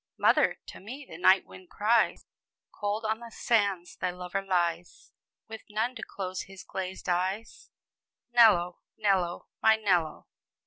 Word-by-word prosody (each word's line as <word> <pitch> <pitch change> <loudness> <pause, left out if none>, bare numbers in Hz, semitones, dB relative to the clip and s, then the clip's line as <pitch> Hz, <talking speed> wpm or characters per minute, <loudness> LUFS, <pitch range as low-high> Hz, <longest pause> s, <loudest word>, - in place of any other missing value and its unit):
"Mother, - - +3
to - - -10
me 260 +8 -9
the 160 - -10
night 185 +2 +5
wind 185 -1 -14
cries. 225 +2 +2 0.5
Cold 210 +2 -3
on 220 +1 0
the 235 -1 -10
sands 200 -7 0
thy 185 - -1
lover 180 +2 -4
lies, 175 -3 -2 0.4
With 220 0 -8
none 220 +4 -1
to 255 - -9
close 185 -1 -5
his 195 -1 -11
glazed 190 0 -6
eyes; 185 +5 -2 0.6
Nello, 200 -8 +5 0.2
Nello, 190 -5 0
my 220 0 +6
Nello!" 180 -8 0
195 Hz, 140 wpm, -29 LUFS, 180-220 Hz, 0.6 s, my